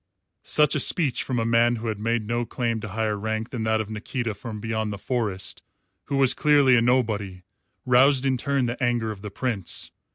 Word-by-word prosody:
Such 150 0 +3
a 150 - +1
speech 140 -2 +2
from 130 - -3
a 115 - 0
man 115 +1 +3
who 115 0 -6
had 110 -2 -3
made 115 0 -1
no 120 +2 -1
claim 115 -1 -2
to 110 - -6
higher 110 +1 -1
rank 110 +2 -3
than 115 -4 -3
that 110 0 +1
of 110 -1 -4
Nikita 115 +1 -3
from 110 +1 -7
beyond 110 -1 -2
the 100 - -5
Forest, 105 -5 -3 0.4
who 140 - -2
was 135 -2 +5
clearly 145 -4 +4
a 115 - +4
nobody, 110 -7 0 0.4
roused 130 +2 +4
in 135 -1 +2
turn 135 +1 0
the 120 +3 -4
anger 120 -3 0
of 100 -2 -9
the 105 - -6
Prince. 105 -4 -3
115 Hz, 205 wpm, -24 LUFS, 110-130 Hz, 0.4 s, was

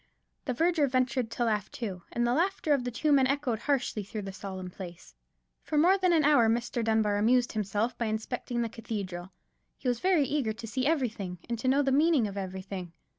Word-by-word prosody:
The 255 - -1
verger 325 -1 +2
ventured 255 -2 0
to 240 +1 -1
laugh 210 -3 0
too: 195 -7 -5
and 240 - 0
the 240 - +2
laughter 345 -1 +1
of 260 -3 0
the - - -1
two 295 +6 0
men 270 -2 +5
echoed 270 -5 0
harshly 265 -6 0
through 210 +1 -6
the 195 0 -6
solemn 190 -1 -6
place. 175 - -10 0.5
For 305 - -3
more 350 +6 +6
than 370 -2 +2
an 325 -2 +4
hour 280 -7 +5
Mr. 235 +1 0
Dunbar 220 -2 +2
amused 240 +4 +3
himself 210 +2 -1
by 235 - 0
inspecting 235 +2 -2
the - - -1
cathedral. 195 -5 -6 0.5
He 265 - -6
was 245 -1 0
eager 295 -10 +2
to 225 +1 -8
see 255 +4 -1
everything, 225 - -1
and 235 -1 -3
to 255 - -2
know 275 +2 +4
the 270 - +1
meaning 295 -4 +4
of 200 - -7
everything. 190 -2 -6
235 Hz, 205 wpm, -29 LUFS, 210-275 Hz, 0.5 s, more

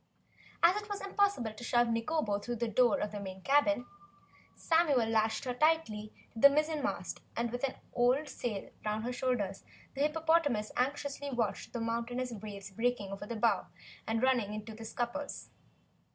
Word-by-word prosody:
As 365 +5 +5
it 420 - -13
was 405 -1 -3
impossible 395 - +1
to 220 - -10
shove 240 0 +3
Nikobo 230 -2 0
through 240 +4 -4
the 235 +1 -1
door 235 +1 +3
of 210 - -2
the 210 - -5
main 190 -1 -7
cabin, 290 -2 +3 0.7
Samuel 315 -8 +3
lashed 220 0 +1
her 250 - -1
tightly 250 -7 +1 0.2
to 225 - -7
the 280 - +10
mizzenmast 305 0 -1 0.2
and 235 0 0
with 245 +2 -4
an 270 - 0 0.2
old 250 +5 +3
sail 235 -7 -4
round 215 +1 -1
her 250 +1 -2
shoulders 245 -7 -1 0.3
the 275 - -3
hippopotamus 300 -7 +2
anxiously 285 +2 -1
watched 230 -7 -2
the 240 - -2
mountainous 235 +2 -2
waves 200 -2 -7
breaking 225 -1 -1
over 195 +1 -6
the 235 - -4
bow 220 -2 +2 0.4
and 225 +2 0
running 260 -4 +4
down 210 - -5
into 215 +1 -6
the 225 +1 -9
scuppers. 245 +6 -4
240 Hz, 170 wpm, -32 LUFS, 220-285 Hz, 0.7 s, the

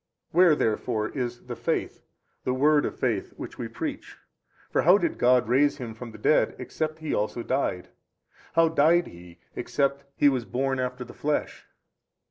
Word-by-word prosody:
Where 175 -2 +6
therefore 110 -3 -1
is 120 -3 -4
the 125 -1 -5
Faith, 120 +1 -2 0.4
the 125 - 0
word 145 +2 +4
of - - -4
faith 115 -6 -1
which - - -8
we - - -3
preach? - - -6 0.5
for - - +2
how 180 +5 +6
did 170 -5 -2
God 125 -1 +4
raise 140 +4 +3
Him 120 -5 -6
from 120 +2 -9
the 110 - -11
dead - - +2
except 155 0 -4
He 160 -1 -4
also 105 +3 -1
died? 130 -10 -1 0.6
how 165 0 +4
died 165 +3 +4
He 85 0 -13 0.2
except 140 0 -1
He 145 - +4
was 130 -4 +2
born 130 +2 -1
after 125 0 -3
the 120 - -12
flesh? 150 0 -2
130 Hz, 170 wpm, -26 LUFS, 120-150 Hz, 0.6 s, Where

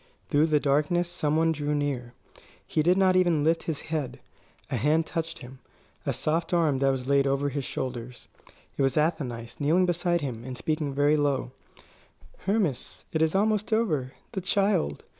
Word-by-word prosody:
Through 150 +2 +4
the 155 -2 +3
darkness 150 +5 +1
some 155 -3 -1
one 165 0 +3
drew 150 -1 -1
near. 130 -4 -2 0.5
He 155 - 0
did 175 +4 +3
not 190 -1 +4
even 175 -5 +3
lift 165 +2 +2
his 160 -3 -4
head. 155 -5 -4 0.5
A - - 0
hand 150 +7 +2
touched 165 -1 -4
him; 130 +1 -11 0.5
a - - +2
soft 165 +3 0
arm 155 -6 +2
was 135 -2 +1
laid 140 0 +3
over 140 +1 +1
his 140 -1 -3
shoulders. 125 -1 -5 0.5
It - - -2
was 135 0 +2
Athenais, 135 -8 -1
kneeling 160 +6 +3
beside 175 -1 +1
him 120 -5 -4
and 130 0 -6
speaking 155 +1 -1
very 145 +2 +3
low: 140 -4 0 1.0
"Hermas 195 - -1
it 160 - +1
is 160 +2 +2
almost 210 +2 +1
over 155 - 0 0.2
the 190 - -3
child! 195 - +1
150 Hz, 170 wpm, -27 LUFS, 135-170 Hz, 1.0 s, Through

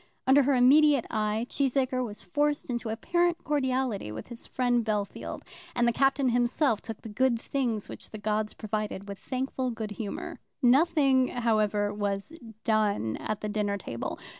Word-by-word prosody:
Under 270 +2 +6
her 275 0 +2
immediate 280 +1 +5
eye 215 +1 0
Cheesacre 260 -2 0
was 210 -4 -7
forced 290 +8 0
into 235 -2 -3
apparent 345 +10 0
cordiality 260 - -1
with 110 - -8
his 235 -1 -9
friend 245 -2 +1
Bellfield, 210 -2 -3 0.3
and 240 -1 +3
the 235 - +3
Captain 270 +1 +2
himself 240 0 +2
took 225 -2 -8
the - - -7
good 235 +2 +1
things 235 -5 -2
which - - -9
the 215 - -7
gods 215 0 -1
provided 210 -2 -4
with 200 -1 -7
thankful 260 +1 -2
good 225 -3 -5
humour. 205 0 -5 0.2
Nothing, 275 -1 +4
however, 215 -4 +1
was 205 +6 -3 0.3
done 210 - +1
at 215 -1 -4
the 210 - -2
dinner 205 -1 -1
table. 120 -11 -5
235 Hz, 160 wpm, -28 LUFS, 210-265 Hz, 0.3 s, Under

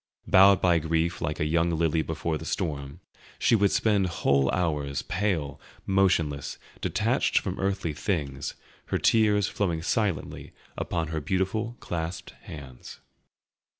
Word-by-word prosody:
Bowed 95 0 +6
by 85 -2 +4
grief 80 +2 -1
like 75 -1 -2
a 75 - +1
young 85 +2 +2
lily 80 -1 +1
before 80 0 -2
the - - -8
storm, 70 -3 -3 0.4
she - - +3
would 100 -2 +3
spend 100 -3 +2
whole 70 -5 +2
hours, 75 -6 -1
pale, 90 -7 -2 0.2
motionless, 90 -8 +1 0.2
detached - - +1
from - - -1
earthly 95 -4 -1
things, 75 -4 -3 0.3
her - - -1
tears 105 -3 +3
flowing 85 -5 -1
silently 100 - -2 0.2
upon 80 -3 -2
her 80 -1 -3
beautiful 95 - -1
clasped 85 +1 -5
hands. 65 -5 -10
85 Hz, 130 wpm, -27 LUFS, 75-95 Hz, 0.4 s, Bowed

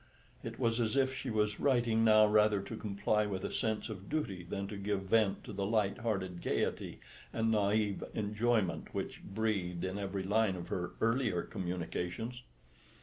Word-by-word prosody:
It - - -6
was 115 -2 +1
as 115 +1 +1
if 130 -1 +3
she 130 0 -4
was 105 -1 +1
writing 120 -5 +3
now 110 -1 +7
rather 105 -1 +4
to 100 +3 -6
comply 105 0 0
with 95 -2 -3
a - - -3
sense 110 -1 -1
of 100 -3 -8
duty 145 -12 -2
than 100 +3 -4
to 105 - -5
give 100 0 -1
vent 100 0 +2
to - - -8
the 100 0 -2
light 105 0 +1
hearted 95 -6 -2
gaiety - - -1 0.3
and 115 0 +1
naïve 105 -1 +1
enjoyment 105 -4 0
which - - -3
breathed 95 -5 -1
in 95 +2 -3
every 100 -1 -2
line 105 0 +2
of 85 -1 -7
her 90 -1 -2
earlier 115 -6 +2
communications. 90 +5 -4
105 Hz, 170 wpm, -33 LUFS, 95-110 Hz, 0.3 s, now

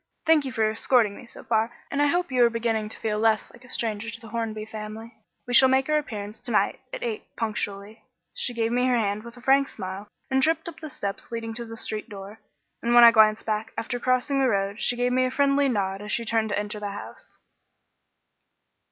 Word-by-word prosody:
Thank 320 -3 +4
you 265 - -3
for 220 -2 +1
escorting 220 -1 +2
me 245 - -12
so - - -11
far, 225 0 +1 0.2
and 280 - 0
I 290 - +4
hope 350 0 0
you 250 -1 +4
are 235 - +6
beginning 225 -2 -1
to - - -7
feel 210 -1 -1
less 220 -1 +2
like 240 - -17
a 250 - -16
stranger 225 -2 -2
to 230 0 -8
the 225 -3 -12
Hornby 220 -2 -3
family. 220 +1 -8 0.3
We 245 - -4
shall 260 +2 +8
make 265 0 +2
our 305 - +4
appearance 210 -6 -7
to - - -7
night - - +1
at - - -6
eight 440 -3 -4
punctually." 210 -1 -4 0.3
She 370 - -1
gave 230 0 0
me 250 +1 +2
her 250 -1 +3
hand 205 -2 0
with 235 +2 -12
a - - -13
frank 270 +2 +3
smile 190 +1 -6 0.2
and 265 0 +3
tripped 325 +5 +1
up 330 -1 -8
the 310 -1 -7
steps 200 -4 -5
leading 230 -1 -4
to 235 +1 -6
the 225 0 -9
street 215 +1 -4
door; 200 +1 -9 0.4
and 235 +1 +1
when 240 - +9
I 235 - +10
glanced 215 -1 +4
back, 215 0 -2
after 245 +2 -3
crossing 255 +3 +1
the 265 -1 +3
road, 200 0 -1
she 245 - +3
gave 245 +1 0
me 255 - +3
a - - +3
little 255 0 -3
friendly 280 0 +3
nod 195 -4 -1
as 210 0 -6
she 235 - -1
turned 225 -1 +1
to 205 - -1
enter 210 0 -3
the 205 -1 -4
house. 350 - -10
230 Hz, 240 wpm, -25 LUFS, 215-255 Hz, 0.4 s, I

